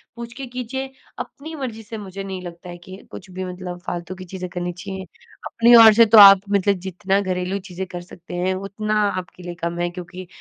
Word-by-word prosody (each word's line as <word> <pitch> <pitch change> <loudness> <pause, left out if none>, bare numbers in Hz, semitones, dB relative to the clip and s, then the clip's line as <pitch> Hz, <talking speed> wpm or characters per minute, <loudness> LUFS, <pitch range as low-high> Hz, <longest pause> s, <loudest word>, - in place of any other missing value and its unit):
पूछ 235 0 -8
के 270 +2 -7
कीजिए, 255 +2 -5 0.3
अपनी 315 +3 -8
मर्जी 240 -6 -6
से 220 +1 -8
मुझे 195 -1 -7
नहीं 190 -1 -6
लगता 175 0 -10
है 175 - -8
कि 185 +2 -12
कुछ 190 - -10
भी 185 +1 -5
मतलब 180 -1 -7
फालतू 175 +1 -5
की 185 0 -10
चीजें 185 0 -6
करनी 175 0 -4
चाहिए 190 +1 -7 0.4
अपनी 235 +1 +5
ओर 220 -1 +9
से 230 +2 +6
तो 225 +1 +5
आप 195 -2 +10
मतलब 200 0 +2
जितना 190 +2 0
घरेलू 185 0 -2
चीजें 185 +1 -5
कर 175 -1 -7
सकते 175 0 -11
हैं 180 +2 0
उतना 210 +3 -2
आपके 185 -1 -7
लिए 175 0 -7
कम 170 0 -2
है 175 0 0
क्योंकि 180 +1 -9
190 Hz, 215 wpm, -21 LUFS, 180-215 Hz, 0.4 s, आप